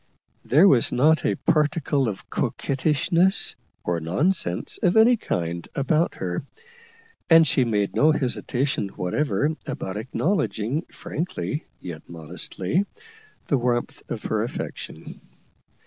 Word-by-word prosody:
There 155 +9 +5
was 130 -9 +4
not 155 +5 +3
a - - +1
particle 150 -3 +1
of 100 - -7
coquettishness, 165 +7 +1 0.3
or 85 -1 -1
nonsense 90 - 0
of 180 +4 +3
any 230 +3 +7
kind, 85 - -3
about 155 +4 +1
her, 90 +3 -3 0.9
and 165 -1 +8
she 135 - +2
made 105 -3 0
no 155 +2 +5
hesitation 130 -4 0
whatever 145 - 0 0.2
about 95 +2 -4
acknowledging, 130 - -1
frankly 165 -2 -4
yet 80 -4 -7
modestly, 90 - -2 0.6
the 140 - +1
warmth 120 0 -1
of - - -4
her - - 0
affection. - - -6
140 Hz, 115 wpm, -24 LUFS, 100-165 Hz, 0.9 s, and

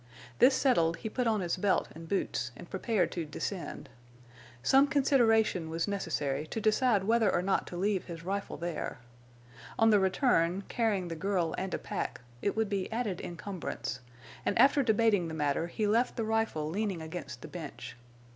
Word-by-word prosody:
This 260 +1 +7
settled, 170 -13 +3
he 220 - -5
put 250 -2 0
on 215 -3 +2
his 175 0 -1
belt 195 +1 +2
and 165 +1 -10
boots 120 -11 -1
and - - -10
prepared 200 +2 0
to 170 - -3
descend. 170 +4 -5 0.8
Some 270 +2 +5
consideration 225 - +3
was 165 +2 -1
necessary 155 -7 -2
to 225 - -4
decide 215 -1 +3
whether 225 +1 +3
or 175 - +1
not 195 +1 +1
to 175 - -6
leave 195 0 0
his 165 -2 -8
rifle 200 +2 -3
there. 170 -1 -4 0.8
On 225 0 +5
the 210 - +6
return, 190 -2 +2
carrying 215 -6 0
the 165 - -4
girl 180 -2 0
and 190 0 -3
a - - -1
pack, - - -4 0.2
it 200 - 0
would 220 -1 +1
be 195 -1 -2
added 220 -6 -2
encumbrance; 175 -5 -5 0.4
and - - 0
after 280 +1 +6
debating 220 -6 +3
the 160 - -5
matter 150 +2 0
he 210 +5 -2
left 230 +4 +2
the 225 - -1
rifle 220 -9 0
leaning 190 -1 -2
against 160 -6 -7
the - - -6
bench. 160 -5 -8
195 Hz, 175 wpm, -31 LUFS, 170-225 Hz, 0.8 s, This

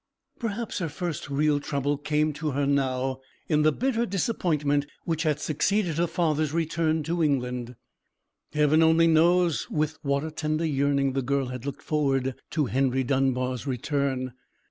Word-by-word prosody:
Perhaps 230 -1 -3
her 170 -3 -2
first 160 -1 -4
real 145 +1 +2
trouble 140 0 -1
came 150 +1 0
to 150 0 -3
her 140 +1 +1
now 130 -2 0 0.3
in 150 -2 +2
the 155 +1 +4
bitter 235 - 0
disappointment 155 -8 0 0.2
which 165 -2 -1
had 155 -3 +1
succeeded 165 +2 0
her 175 - +2
father's 155 -4 0
return 160 -1 0
to 170 +3 -1
England. 125 -4 -1 0.8
Heaven 150 +1 +3
only 160 +1 +5
knows 170 +1 +3
with 155 0 -1
what 140 0 0
a 160 - -4
tender 155 +1 -1
yearning 140 -2 +1
the 135 - 0
girl 135 0 -1
had 125 +1 -6
looked 140 - -6
forward 135 -4 0 0.2
to 150 -2 0
Henry 130 +1 +1
Dunbar's 130 -1 0
return. 135 -1 -1
150 Hz, 155 wpm, -26 LUFS, 135-160 Hz, 0.8 s, only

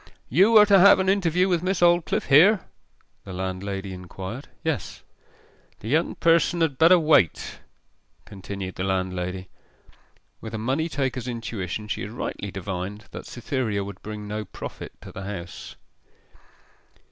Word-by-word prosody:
'You 195 - +5
are 210 - +9
to 200 -2 +6
have 200 +2 +8
an 190 0 +1
interview 180 -2 +2
with 175 -3 +1
Miss 185 0 -1
Aldclyffe 175 -1 +3
here?' 185 +9 +6 0.6
the 95 - -9
landlady 95 +1 -4
inquired. 95 - -8 0.2
'Yes.' 160 -5 -3 0.8
'The 110 - -7
young 160 +5 +1
person 170 +1 +3
had 145 -5 0
better 170 +3 +7
wait,' 150 - +2 0.7
continued 95 -1 -7
the 95 - -4
landlady. 95 -1 -2 0.9
With 110 0 -6
a - - -2
money 135 +9 -1
taker's 130 -4 -2
intuition 110 -4 -4
she - - -3
had 100 - -5
rightly 105 -2 -5
divined 95 +2 -6
that - - -8
Cytherea 120 -4 -2
would 100 -1 -9
bring 105 -1 -7
no 105 +1 -3
profit 95 - -9
to - - -10
the 95 - -8
house. 90 -4 -7
110 Hz, 145 wpm, -24 LUFS, -, 0.9 s, are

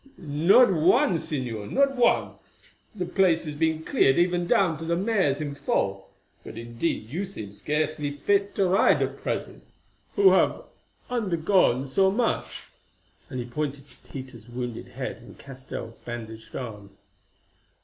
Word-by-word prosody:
"Not 170 - +4
one, 185 - +3
Señor—not 150 - -1
one; 245 -2 +3 0.6
the 185 -3 -2
place 175 -2 +2
has 150 - -4
been 160 +1 0
cleared 135 -3 +3
even 175 0 +2
down 170 -6 +2
to - - -6
the 170 +1 0
mares 185 -7 +1
in 145 -2 -3
foal. 100 -8 -2 0.3
But, - - -10
indeed 115 0 -3
you 175 +7 -2
seem 110 - -7
scarcely 150 +6 -1
fit 200 +8 0
to 195 - +2
ride 185 +1 +4
at - - -5
present, - - -4 0.5
who 395 -1 +6
have - - +2 0.5
undergone 180 - +2
so 190 +8 +3
much," 230 +4 -1 0.7
and 130 - -5
he 120 - -3
pointed 140 +2 -4
to - - -23
Peter's 125 -4 -9
wounded 120 -1 -5
head 125 -6 -5
and 115 +1 -15
Castell's 130 -4 -8
bandaged 110 -2 -8
arm. 105 -5 -7
150 Hz, 140 wpm, -26 LUFS, 125-185 Hz, 0.7 s, who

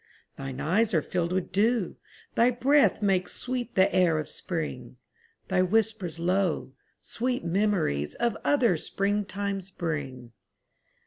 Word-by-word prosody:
Thine 135 -1 -6
eyes 200 +5 +1
are 160 - +4
filled 175 -1 -1
with 185 -1 -1
dew, 210 +1 +1 0.4
thy 235 +2 +4
breath 265 0 +3
Makes 185 -3 +1
sweet 250 -1 -4
the 190 0 +4
air 175 -4 +3
of 155 - -3
spring; 140 -9 -4 0.5
Thy 185 -1 +2
whispers 200 -3 0
low, 180 -4 0 0.3
sweet 245 -4 -2
memories 170 - 0
Of 235 -2 0
other 240 - +3
springtimes 200 +1 -2
bring. 145 -9 -4
190 Hz, 125 wpm, -27 LUFS, 165-220 Hz, 0.5 s, are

